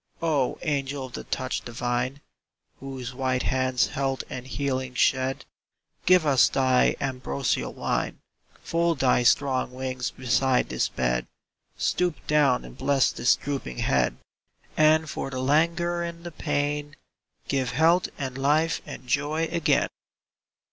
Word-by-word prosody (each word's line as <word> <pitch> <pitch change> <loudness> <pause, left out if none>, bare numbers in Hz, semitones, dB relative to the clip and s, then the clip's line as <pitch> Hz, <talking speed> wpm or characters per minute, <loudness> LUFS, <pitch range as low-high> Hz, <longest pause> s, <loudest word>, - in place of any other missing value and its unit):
O 145 -6 +1
angel 140 -3 -2
of 125 - -12
the - - -6
touch 130 - -2
divine, 120 +3 -2 0.6
Whose 130 -2 -6
white 130 -1 -1
hands 130 -1 +1
health 135 -1 -2
and 125 0 -6
healing 130 -2 -2
shed, 130 +1 +1 0.6
Give 180 -2 +6
us 135 -4 +5
of - - -7
thy 130 -1 +3
ambrosial 125 - -2
wine, - - -2 0.2
— - - -30
Fold 170 -1 +1
thy 130 -2 +3
strong 130 +1 +2
wings 130 -1 -3
beside 130 0 +1
this 65 - 0
bed - - -1 0.3
— - - -43
Stoop 180 -3 +1
down 145 -4 +3
and - - -11
bless 135 0 +2
this 120 - +3
drooping 135 - -5
head, 65 -2 +1 0.6
And 155 +1 +4
for 140 - -4
the 130 - -5
languor 170 +5 +1
and 170 0 -5
the 175 - -6
pain 145 -1 -2 0.5
Give 135 -3 0
health 165 +6 +3
and 135 -2 -4
life 155 +4 +2
and - - -8
joy 150 +5 0
again 170 -2 +2
135 Hz, 140 wpm, -26 LUFS, 130-150 Hz, 0.6 s, Give